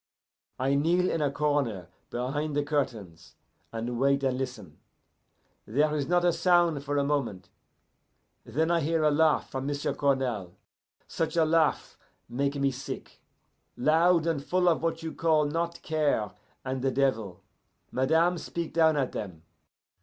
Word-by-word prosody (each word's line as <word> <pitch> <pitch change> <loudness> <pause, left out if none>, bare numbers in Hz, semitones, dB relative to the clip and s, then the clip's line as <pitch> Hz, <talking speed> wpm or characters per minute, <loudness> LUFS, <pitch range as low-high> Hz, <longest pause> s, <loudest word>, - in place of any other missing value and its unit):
"I 135 +2 +1
kneel 170 +6 +2
in 165 - -1
a 145 - +2
corner 140 - -1 0.2
behind 140 +5 -2
the 145 - +1
curtains, 105 - -3 0.4
and 115 +1 -4
wait 140 +1 +2
and 130 -1 +1
listen. 125 - -6 0.9
There 150 +7 +2
is 145 -2 -1
not 175 0 +2
a 175 - +4
sound 175 -5 +3
for 145 0 -2
a 140 - +2
moment; 140 -10 -2 0.9
then 160 +4 0
I 170 - +3
hear 160 +1 0
a 150 - +4
laugh 155 +1 +2
from 135 +1 -3
M'sieu' 145 0 -1
Cournal, 125 -10 -1 0.5
such 165 +1 -2
a 165 - +5
laugh 160 -1 +1 0.3
make 140 +3 -1
me 140 -1 +1
sick 130 +1 -8 0.6
loud, 165 +4 +3
and 160 -4 -1
full 180 +3 +1
of 170 - +3
what 165 0 -2
you 160 - -4
call 160 -2 +2
not 170 +3 -3
care 150 -9 0 0.3
and 130 0 -3
the 135 - +1
devil. 115 -9 -1 0.5
Madame 160 +6 +2
speak 170 0 -5
down 160 -2 +4
at 135 -3 0
them. 90 -7 -6
145 Hz, 155 wpm, -28 LUFS, 130-160 Hz, 0.9 s, a